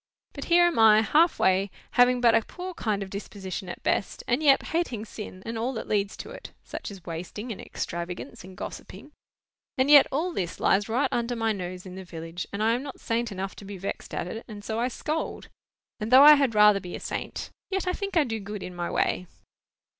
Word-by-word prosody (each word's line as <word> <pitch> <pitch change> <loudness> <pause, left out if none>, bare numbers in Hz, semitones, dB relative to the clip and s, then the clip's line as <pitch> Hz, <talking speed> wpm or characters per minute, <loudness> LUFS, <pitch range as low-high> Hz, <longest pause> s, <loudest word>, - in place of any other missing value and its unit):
But - - -6
here 350 0 +5
am 345 -8 +1
I, 220 -1 +7
half 320 +8 +4
way, 190 +1 +2 0.2
having 245 0 +4
but 235 -2 +5
a 225 - +5
poor 365 +10 -7
kind 210 - -1
of 190 - -10
disposition 195 -2 -6
at - - -8
best, - - -1
and 245 +4 +1
yet 280 -3 +5
hating 280 -10 -1
sin, 205 -4 -9
and 230 0 -4
all 245 +4 -1
that 225 - -5
leads 200 -1 0
to - - -8
it, - - -10
such - - -7
as 195 -4 -11
wasting, 180 +8 -6
and 205 - -6
extravagance, 170 -6 -6
and 185 0 -12
gossiping,—and 265 +3 -6
yet 290 -2 +9
all 335 +6 -1
this 175 - -3
lies 200 +2 +2
right 245 +6 +2
under 240 +1 -1
my 225 -1 +1
nose 185 -2 -5
in 185 - -9
the 190 +1 -7
village, 165 0 -7
and 200 +2 -2
I 225 - +4
am 245 - -1
not 275 -1 -8
saint 230 0 -1
enough 195 0 -5
to - - -10
be 200 0 -7
vexed 195 +2 -5
at - - -2
it; 225 +6 -6
and 210 -2 -9
so 220 0 -2
I 240 - +1
scold. 310 +5 -4 0.5
And 215 0 -3
though 260 +2 +9
I 300 +1 +11
had 275 -6 +2
rather 210 -1 +6
be 180 -2 -7
a - - -6
saint, - - -5 0.2
yet 385 -1 -1
I 365 - +1
think 395 -2 -3
I 320 - +6
do 225 -5 -3
good 205 0 -6
in 180 - -7
my 175 0 -3
way." 180 - 0
220 Hz, 225 wpm, -27 LUFS, 190-260 Hz, 0.5 s, I